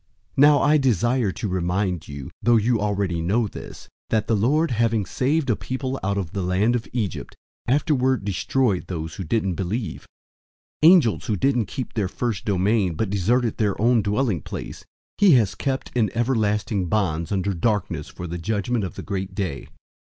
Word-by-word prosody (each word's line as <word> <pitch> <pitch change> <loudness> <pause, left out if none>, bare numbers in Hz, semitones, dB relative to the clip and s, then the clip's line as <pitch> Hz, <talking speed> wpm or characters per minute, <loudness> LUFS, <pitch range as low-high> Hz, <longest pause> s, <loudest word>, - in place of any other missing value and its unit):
001:005 - - -35
Now 145 +1 +6
I 150 +1 +5
desire 120 -3 +1
to 110 - -4
remind 90 -1 -1
you, 70 -2 -8
though 120 0 +4
you 115 +1 +2
already 100 -5 -1
know 105 +8 +1
this, - - -10 0.2
that 110 -1 +1
the 115 - +1
Lord, 145 +10 +2
having 115 -2 +1
saved 140 +7 0
a - - +2
people 130 +3 -4
out 100 +1 0
of 90 -5 -3
the 100 - -3
land 95 +6 +1
of 115 - -3
Egypt, 110 -6 -3 0.3
afterward 130 - +1
destroyed 105 +1 0
those 80 -3 -5
who 95 - -4
didn't 95 +1 0
believe. 100 +6 -4 0.8
001:006 160 - +10
Angels 155 - +3
who 110 - +1
didn't 120 -1 +1
keep 130 +4 -5
their 105 -4 0
first 110 0 -3
domain, 100 -2 +1
but 105 +3 -2
deserted 115 +4 +1
their 105 -3 0
own 115 +1 +4
dwelling 105 - 0
place, - - -7 0.4
he 200 -5 +6
has 110 -6 +3
kept 135 -2 -3
in 115 -4 +2
everlasting 105 -5 0
bonds 85 -5 -1
under 100 0 0
darkness 95 -4 -1
for 90 - -8
the 85 0 -5
judgment 110 +4 -1
of 95 - -5
the - - -7
great 95 -2 -4
day. 95 -9 -3
105 Hz, 180 wpm, -23 LUFS, 95-120 Hz, 0.8 s, 001:006